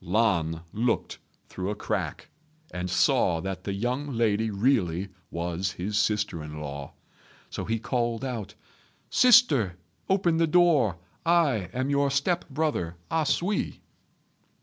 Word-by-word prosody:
Lan 85 -5 +1
looked 115 +2 -1 0.3
through 95 +1 -4
a 105 - -2
crack, - - -3 0.4
and 90 0 -3
saw 95 - +3
that 95 +2 -5
the 100 - -2
young 125 +8 -2
lady 110 -1 +2
really 100 -5 +1 0.2
was 85 +1 -2
his 100 +4 -4
sister 105 -7 0
in 75 0 -7
law; 70 -2 -6 0.6
so - - -4
he 115 +1 0
called 120 +1 -1
out, 120 -6 -5 0.6
"Sister, 150 - +5 0.3
open 180 -4 +2
the 165 0 +3
door. 155 - +4 0.3
I 155 - +2
am 130 +5 -1
your 140 0 +2
step 145 +6 0
brother 140 - -1 0.2
A 160 -2 +1
sui." 195 +8 -1
110 Hz, 130 wpm, -27 LUFS, 90-140 Hz, 0.6 s, Sister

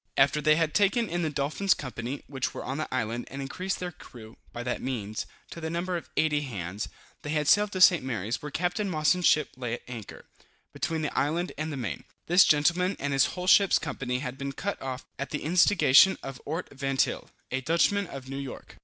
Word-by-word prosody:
After 140 +2 +4
they 155 0 +5
had 160 -1 +1
taken 210 +3 +3
in 175 -1 -2
the 160 - 0
Dolphin's 150 +7 +1
company, 130 0 -5
which 130 -2 -3
were - - -5
on 135 +4 -3
the 155 - -4
island, 120 -1 -2
and 135 - -7
increased 180 +8 -3
their 180 -1 -4
crew, 115 -7 -13 0.2
by 120 - -6
that 125 0 -2
means, 110 -5 -3 0.2
to 170 - -8
the 160 - -3
number 175 +2 -2
of 170 - -5
80 150 -2 +2
hands, 100 -7 -5 0.3
they 150 0 -1
sailed 205 +7 +4
to 185 - -2
St. 175 -6 +7
Mary's, 115 -3 -3
where 150 - -5
Capt. 180 +6 -1
Mosson's 180 -1 +2
ship 150 - +3
lay 125 -3 -4
at - - -13
anchor, 115 -5 -9 0.5
between 160 -1 -2
the 150 - -3
island 165 +5 0
and 155 +1 -3
the 145 - -4
main. 105 - -4 0.2
This 175 +2 +6
gentleman 175 +6 +3
and 145 0 -1
his 135 - +4
whole 180 - -3
ship's 200 +1 +6
company 125 -4 -3
had 130 0 -5
been 140 0 -4
cut 200 +8 -4
off 130 0 -5
at 140 - -3
the 145 - -4
instigation 170 0 +5
of 135 -2 -7
Ort 160 +5 -4
Vantyle, 135 0 -1 0.2
a 130 +1 -1
Dutchman 170 +7 +2
of 135 -4 -8
New 135 +1 -5
York. 135 -2 -8
145 Hz, 210 wpm, -28 LUFS, 130-175 Hz, 0.5 s, St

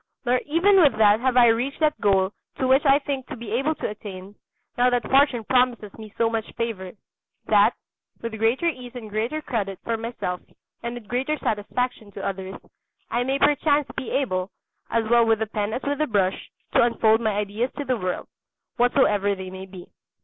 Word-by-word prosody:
Nor 250 +1 +3
even 355 +7 +4
with 280 -9 +4
that 210 -1 +5
have 255 0 +1
I 240 -1 +7
reached 245 +5 0
that 310 -1 +1
goal 195 -1 +2 0.2
to 260 - 0
which 265 +2 +4
I 275 0 +7
think 275 -3 -4
to 300 - -6
be 230 -3 -8
able 270 +7 0
to - - -3
attain, 200 -2 -9 0.4
now 245 +1 +4
that 245 -3 0
Fortune 270 -4 +3
promises 245 -4 +1
me 215 -2 -11
so 230 - +3
much 225 -1 -3
favour, 215 -6 -4 0.5
that, - - +4 0.4
with 230 -2 -6
greater 230 +9 +2
ease 255 -5 -4
and 220 -4 -8
greater 235 +9 -2
credit 200 -7 -3
for 230 -1 -1
myself 225 -6 -4 0.4
and 235 0 -4
with 235 -4 -10
greater 265 +6 -1
satisfaction 220 0 -2
to 195 - -6
others, 190 0 -4 0.6
I 240 - +1
may 265 +2 0
perchance 290 0 +2
be - - -4
able, 185 -9 -1 0.4
as 230 -1 0
well 235 +1 +5
with 225 -1 +3
the 220 - -1
pen 210 0 -3
as 245 - -4
with 285 0 -2
the 305 - +1
brush, 195 -4 0 0.2
to - - +5
unfold 225 -1 +3
my 220 -2 +1
ideas 210 +4 -1
to 290 - -3
the 255 - +1
world, 185 -5 -3 0.5
whatsoever 210 -5 +3
they 190 -1 -7
may 190 0 -8
be. 185 -2 -11
230 Hz, 195 wpm, -24 LUFS, 205-260 Hz, 0.6 s, I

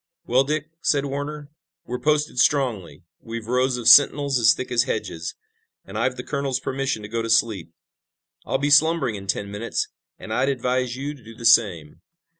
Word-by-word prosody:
"Well, 130 +3 +3
Dick," 155 +2 -3
said 145 -1 +1
Warner, 145 +1 -5 0.3
"we're 125 0 -5
posted 150 -4 0
strongly. 120 - 0 0.2
We've 115 -1 -7
rows 125 +2 0
of 120 - -4
sentinels 140 -2 +6
as 115 - +5
thick 130 - -6
as 120 0 +2
hedges, 80 -10 -4 0.5
and 95 - -11
I've 125 +4 0
the 125 - -6
colonel's 140 -2 -2
permission 135 -4 -3
to - - -6
go 115 +2 -3
to 115 - -4
sleep. 110 -7 +1 0.7
I'll - - -1
be 145 +2 -1
slumbering 145 -4 +4
in 100 -1 -8
ten 100 +1 -2
minutes, 105 +3 -3 0.3
and - - -7
I'd 135 - +1
advise 125 -1 -1
you 140 +3 -5
to 135 -5 -17
do 115 +1 -13
the 115 0 -8
same." 85 -9 +3
125 Hz, 185 wpm, -23 LUFS, 115-140 Hz, 0.7 s, sentinels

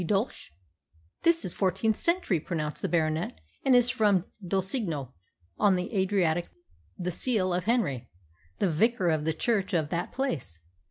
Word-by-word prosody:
D' - - -2
DOELSC'H 200 - -1 0.4
+ 80 +1 -36
"This 335 0 +3
is 180 - -2
fourteenth 210 +3 +1
century," 340 - +1
pronounced 150 -2 -3
the - - -1
Baronet, 155 - 0 0.2
"and 265 -2 +5
is 245 0 +5
from 205 -7 +2 0.2
Dulcigno, 185 - -2 0.5
on 200 -2 +5
the 180 +5 -3
Adriatic 185 -3 +1 0.5
the 180 0 -2
seal 185 -2 0
of 180 0 -1
Henry, 210 - 0 0.5
the 190 - +1
vicar 195 +2 +2
of 155 -2 0
the 160 - +1
church 200 0 0
of 155 -3 +1
that 170 +1 -2
place. 150 - -3
185 Hz, 160 wpm, -28 LUFS, 160-220 Hz, 0.5 s, and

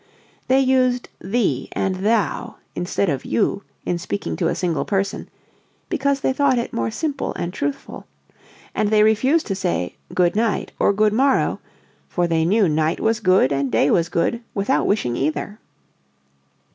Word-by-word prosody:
They 260 +1 +4
used 255 -2 +2
"thee" 215 +3 -1
and 190 -1 -1
"thou" 210 +1 0 0.2
instead 185 +2 -1
of 140 -5 -1
"you" 115 - 0 0.2
in 175 - -1
speaking 100 - -3
to - - +1
a - - 0
single 170 -4 -1
person 195 -1 -2 0.6
(because 280 -1 0
they 265 - +1
thought 275 -2 +2
it 235 - -3
more 115 -1 -1
simple 290 - -3
and 175 +1 -4
truthful), 285 +3 -4 0.7
and 215 -1 0
they 210 0 +4
refused 260 +9 +3
to 195 - -2
say 180 - -2
"goodnight" 200 +4 +1
or - - +4
"goodmorrow," 215 +7 +2 0.5
"for 175 - 0
they 165 -1 +1
knew 200 +3 +3
night 155 0 0
was 225 0 +1
good 185 -7 +3
and 140 -2 -1
day 115 +5 +3
was 165 -1 +2
good 230 +8 0
without 205 +7 +1
wishing 125 - 0
either." 155 - -2
200 Hz, 155 wpm, -21 LUFS, 170-240 Hz, 0.7 s, They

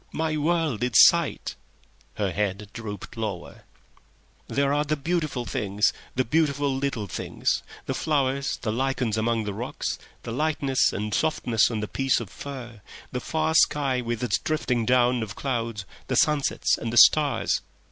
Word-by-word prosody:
"My 160 -1 -1
world 155 -5 0
is 125 -1 -1
sight." - - +5 0.6
Her 100 -3 -1
head 100 +1 -2
drooped 110 -4 -7
lower. 105 -6 -5 0.8
"There 140 0 +1
are 145 +1 +2
the 150 +1 -1
beautiful 155 -4 -2
things, 105 -1 0 0.2
the 130 0 +1
beautiful 145 -1 +1
little 135 -6 -2
things—the 95 - -3
flowers, 140 -3 0
the 110 - 0
lichens 125 -2 0
amidst 110 0 0
the 105 - -3
rocks, - - -4 0.2
the 115 - -5
light 150 +5 0 0.3
and 105 +1 -2
softness 120 -7 +2
on 110 -3 -3
a - - -3
piece 135 +3 +1
of 110 -6 -8
fur, 120 -5 -8 0.3
the 125 - -3
far 160 +2 -1
sky 140 -5 +3
with 120 -1 -3
its 110 -6 +1
drifting 125 -7 -1
dawn 125 -1 +3
of 105 -4 -5
clouds, 115 -6 -3 0.2
the - - -1
sunsets 150 -2 +2
and 115 - -3
the 120 - -2
stars. 150 +1 +5
125 Hz, 155 wpm, -25 LUFS, 110-145 Hz, 0.8 s, sight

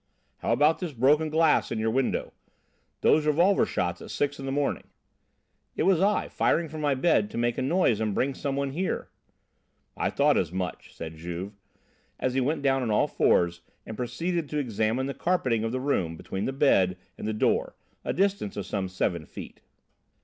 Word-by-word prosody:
"How - - -1
about 150 +7 +3
this 175 -5 -4
broken 145 +6 +3
glass 160 0 +3
in - - -1
your 110 0 0
window? 130 +2 -1 0.7
Those 155 0 +4
revolver 175 +6 +4
shots 85 -1 -2
at - - -9
six 145 0 -1
in 135 - -5
the - - -1
morning?" 145 +1 -1 0.9
"It - - 0
was 185 -1 +3
I, 205 +2 +2
firing 165 -1 +1
from 155 0 -6
my 145 -2 +2
bed 130 -7 +2
to - - -7
make 120 0 +1
a - - 0
noise 130 - +2
and 105 -2 -1
bring 135 +1 +1
some 135 +1 -3
one 140 -1 -1
here." 180 +7 -2 0.9
"I - - 0
thought - - +3
as - - -2
much," 90 -1 -5
said 80 -1 -7
Juve, 90 +4 -6 0.7
as 130 - 0
he 135 - +1
went 145 +3 -1
down 135 -1 +2
on 120 - -1
all 105 - +3
fours 85 -1 +2 0.2
and 110 - -7
proceeded 150 +8 -2
to 150 - -3
examine 115 -1 0
the 140 - -3
carpeting 130 -9 0
of 115 - -1
the 130 - -2
room 95 - -1
between 95 +4 -4
the - - -1
bed 100 -10 +3 0.2
and - - -6
the - - 0
door, 105 - 0 0.3
a - - -1
distance 195 - 0
of 100 - -3
some 100 -1 -2
seven 90 -3 -2
feet. - - -10
130 Hz, 195 wpm, -27 LUFS, 105-150 Hz, 0.9 s, Those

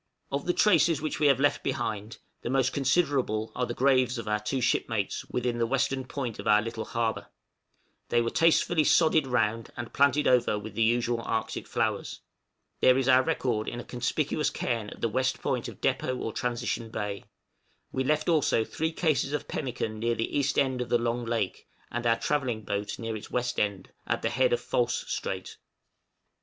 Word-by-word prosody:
} - - -45
Of 140 +3 -2
the 175 - +3
traces 170 -7 +4
which 155 0 -3
we 150 - +4
have 135 -2 +4
left 145 +1 +2
behind 110 -5 -3
us, - - -25 0.2
the - - -4
most 130 0 +2
considerable 135 -6 +1
are 125 -1 -1
the 120 - -4
graves 130 -1 +3
of 115 -2 -6
our 105 0 +1
two 105 +6 -2
shipmates 115 -4 0
within 120 -1 -2
the 115 - +2
western 135 +1 0
point 130 -4 -4
of - - -5
our 105 - +6
little 115 0 -4
harbor; 115 -1 -2 0.8
they 120 - +3
were 115 0 0
tastefully 165 0 +3
sodded 155 -2 +4
round, 115 -2 0
and 120 -1 -6
planted 140 +1 +3
over 125 -4 +3
with 105 +1 -7
the 115 - -2
usual 120 +1 +2
Arctic 110 -1 -3
flowers. - - -2 0.6
There 130 0 +5
is 135 -1 0
our 130 0 +6
record 130 -7 -1
in 120 - -4
a - - -6
conspicuous 140 +5 -1
cairn 115 -4 -2
at - - -12
the - - +2
west 130 +3 0
point - - -1
of - - -10
Depôt 130 -1 0
or 115 - -3
Transition 120 -2 -2
Bay: 105 -2 -4 0.7
we 130 - -1
left 150 +3 +1
also 155 -9 +3
three 160 +8 -2
cases 155 -4 0
of 150 - -2
pemmican 120 -5 -3
near 115 +1 0
the 115 - -3
east 140 -1 +1
end 130 -2 +2
of 120 - -4
the 120 - +4
Long 120 0 -1
Lake, 115 -5 -2 0.2
and 120 0 -2
our 115 0 +4
travelling 130 -7 -1
boat 100 0 -3
near 115 -1 -4
its 105 - -8
west 125 0 -1
end, 100 -3 -2 0.2
at - - -1
the - - 0
head - - +2
of 480 - +1
False - - 0
Strait. - - -4
125 Hz, 200 wpm, -28 LUFS, 115-140 Hz, 0.8 s, our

